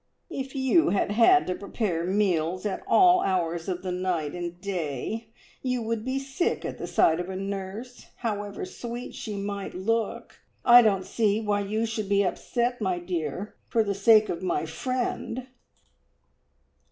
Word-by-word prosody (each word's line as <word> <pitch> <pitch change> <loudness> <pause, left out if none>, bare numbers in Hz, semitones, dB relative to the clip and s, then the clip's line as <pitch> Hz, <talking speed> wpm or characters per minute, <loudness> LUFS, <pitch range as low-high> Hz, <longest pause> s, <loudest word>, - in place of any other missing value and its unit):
"If 270 +1 -5
you 270 +5 +3
had 200 0 +1
had 240 - +5
to 180 - -1
prepare 180 -3 -2
meals 185 -2 +1
at 205 - -2
all 365 -2 +6
hours 175 -2 -1
of 180 0 -3
the 185 - -2
night 180 -5 -1
and 175 0 -5
day, 185 - -3 0.3
you 250 -2 -1
would 225 -1 -2
be 260 +2 -1
sick 275 +6 -1
of - - -5
the - - -4
sight 160 +1 +3
of 180 +1 -4
a 190 - -4
nurse, 195 +5 -6
however 205 - -3
sweet 245 -9 -7
she 215 -2 -5
might 200 -1 -4
look! 225 +4 -2 0.3
I 245 0 +10
don't 195 -5 +2
see 210 +1 +1
why 210 -2 0
you 215 +3 -1
should 220 -3 -3
be 200 0 +3
upset, 240 +6 -1
my 185 -3 0
dear, 175 +1 -4
for 225 - +2
the 200 -1 -1
sake 215 +2 +5
of 170 - -3
my 180 -3 0
friend." 250 +5 -3
205 Hz, 165 wpm, -27 LUFS, 185-235 Hz, 0.3 s, I